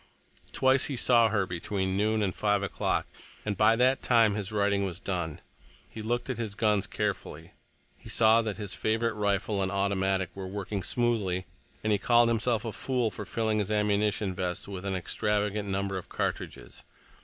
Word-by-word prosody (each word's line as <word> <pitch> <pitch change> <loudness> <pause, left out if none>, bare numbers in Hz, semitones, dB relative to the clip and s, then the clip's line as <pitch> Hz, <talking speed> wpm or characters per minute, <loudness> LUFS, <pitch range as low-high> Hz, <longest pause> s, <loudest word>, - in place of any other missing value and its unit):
Twice 130 0 +3
he 140 - -2
saw 120 -2 +5
her 105 -3 +1
between 95 +2 -2
noon 110 +2 +1
and 95 -3 0
five 105 -1 +1
o'clock, 100 - -1 0.4
and 105 -1 -1
by 110 +3 +5
that 130 +3 +3
time 115 -4 +4
his 105 0 -4
writing 100 -1 +1
was 95 -2 -4
done. 85 -5 -3 0.5
He 110 - -9
looked 120 +2 -2
at 130 -2 -3
his 110 -3 -3
guns 105 -3 +1
carefully. 80 +4 -4 0.5
He - - -12
saw 115 0 +5
that 110 -3 -3
his 100 -3 -5
favorite 110 +1 0
rifle 100 -1 0
and 95 0 -1
automatic 95 -2 0
were 95 -1 -6
working 100 +1 -4
smoothly, 100 -5 0 0.4
and 110 - +1
he 100 - +1
called 120 +2 +4
himself 115 -1 +1
a 115 - -2
fool 125 -1 -1
for 105 -1 -7
filling 110 -2 0
his 105 -1 -1
ammunition 105 -1 +1
vest 90 -1 -3
with 95 -1 -7
an 95 -1 -1
extravagant 105 +2 -1
number 100 0 -1
of - - -13
cartridges. - - -4
105 Hz, 180 wpm, -28 LUFS, 95-110 Hz, 0.5 s, saw